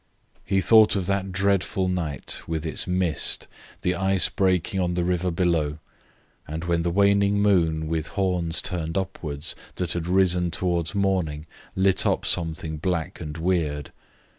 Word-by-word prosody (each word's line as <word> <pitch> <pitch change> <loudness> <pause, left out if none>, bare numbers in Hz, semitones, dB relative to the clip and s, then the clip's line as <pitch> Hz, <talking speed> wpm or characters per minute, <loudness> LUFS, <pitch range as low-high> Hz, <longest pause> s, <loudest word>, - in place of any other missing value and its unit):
He 95 -1 +1
thought 110 +4 +6
of 95 -3 -1
that 100 0 -1
dreadful 95 0 +1
night, 85 -7 -2
with 80 -1 -3
its 80 - -3
mist, 90 -4 0 0.3
the 90 - +1
ice 95 +1 +2
breaking 95 0 0
on 90 -1 0
the 90 - 0
river 90 0 0
below, 80 -4 0 0.7
and 80 +2 -5
when 85 -1 0
the 85 - 0
waning 100 +2 +3
moon, 85 -6 +2
with 80 -1 -2
horns 90 -4 0
turned 80 -3 -3
upwards, 80 -6 -3 0.2
that 90 -3 -2
had 85 -1 -2
risen 90 -1 +3
towards 85 0 -1
morning, 90 -7 0 0.3
lit 95 0 +2
up - - 0
something 80 -2 -1
black 85 -1 -2
and 75 +1 -6
weird. 80 -4 -1
90 Hz, 150 wpm, -24 LUFS, 80-95 Hz, 0.7 s, thought